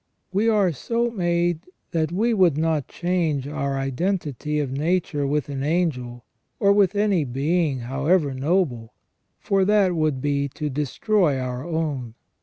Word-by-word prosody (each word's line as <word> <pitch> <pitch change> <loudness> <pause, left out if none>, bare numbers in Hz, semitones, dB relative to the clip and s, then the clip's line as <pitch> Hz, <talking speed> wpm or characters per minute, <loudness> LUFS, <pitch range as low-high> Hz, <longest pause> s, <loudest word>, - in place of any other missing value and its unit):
We 210 +4 +2
are 205 -5 +3
so 235 - -1
made 175 -4 0 0.3
that 160 -1 0
we 225 +6 +1
would 180 -8 +3
not 160 -3 0
change 170 -6 -1
our 140 -2 -2
identity 150 - -2
of 140 -3 -2
nature 150 0 0
with 150 0 0
an 140 -2 -4
angel 135 -7 -1 0.3
or 200 0 +5
with 200 -1 +3
any 200 -5 +2
being 140 +2 0
however 140 +5 +1
noble, 130 -5 -1 0.4
for 195 -2 +1
that 200 -2 +3
would 155 -4 0
be 140 +1 0
to 150 -1 -3
destroy 150 - +1
our 125 0 -4
own. 150 -8 -3
155 Hz, 145 wpm, -23 LUFS, 140-185 Hz, 0.4 s, or